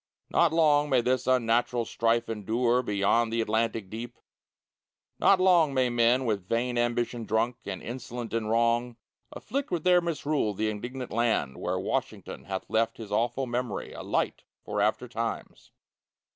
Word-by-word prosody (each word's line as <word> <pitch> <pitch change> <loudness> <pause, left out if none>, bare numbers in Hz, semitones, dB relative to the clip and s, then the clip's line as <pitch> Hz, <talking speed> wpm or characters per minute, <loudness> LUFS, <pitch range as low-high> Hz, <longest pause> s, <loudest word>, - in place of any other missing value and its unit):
Not 170 -2 +4
long 150 -2 +3
may 130 -3 +4
this 125 +1 0
unnatural 120 -1 +2
strife 115 +1 0
endure 115 +3 +1
Beyond 110 +1 +1
the 115 - -1
Atlantic 110 -1 0
deep; 115 +4 -7 1.0
Not 195 - +5
long 175 -6 +4
may 130 -2 +2
men, 120 +2 +3
with 100 -5 -1
vain 120 +3 0
ambition 120 0 -1
drunk, 115 +3 0
And 95 -2 -5
insolent 120 -1 -6
in 115 -2 -1
wrong, 115 +1 +1 0.3
Afflict 280 +1 -4
with 170 -3 -2
their 180 -1 +5
misrule 150 -9 -1
the 110 +2 0
indignant 125 +4 -6
land 110 - 0
Where - - -2
Washington - - -4
hath 95 -1 -5
left 115 +1 0
His 110 -3 -9
awful 120 +5 0
memory 120 -2 -3
A - - -7
light - - -1 0.2
for 105 0 -2
after 110 +4 +1
times! 115 -1 -5
120 Hz, 155 wpm, -28 LUFS, 110-125 Hz, 1.0 s, Not